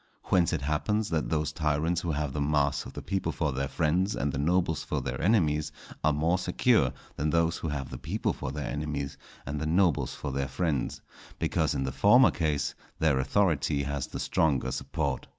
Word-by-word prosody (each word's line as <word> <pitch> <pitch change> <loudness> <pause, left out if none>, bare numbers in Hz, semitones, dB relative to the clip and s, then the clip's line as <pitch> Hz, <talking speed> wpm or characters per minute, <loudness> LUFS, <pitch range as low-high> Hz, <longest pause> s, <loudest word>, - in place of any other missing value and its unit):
Whence 90 -3 +4
it - - -2
happens 105 +9 0
that 80 -2 0
those 75 -1 0
tyrants 80 +2 0
who 85 - -3
have 75 -3 -1
the 75 - -2
mass 70 -1 +1
of - - -11
the - - -7
people 95 -1 -1
for 80 -3 -1
their 70 +1 -2
friends 90 +8 +1
and 70 - -1
the 70 - -2
nobles 85 +1 +1
for - - -2
their - - -4
enemies, 80 -6 +2 0.3
are 80 - +4
more 80 +5 +1
secure 95 - +3 0.3
than 75 +2 0
those 85 +2 +2
who - - -4
have 70 -3 -3
the - - -6
people - - -1
for 65 - -5
their 75 +1 -4
enemies 75 -2 -3 0.3
and 70 +2 -3
the 80 - -1
nobles 85 -1 +2
for 70 - -4
their 70 0 -1
friends; 70 0 -1 0.4
because - - 0
in 65 - 0
the 65 - -2
former 120 - +6
case 75 -4 -1 0.2
their 75 -4 +2
authority 70 -2 +1
has 70 -1 -3
the - - -6
stronger 75 -5 +1
support. 70 0 -2
75 Hz, 200 wpm, -28 LUFS, 70-85 Hz, 0.4 s, former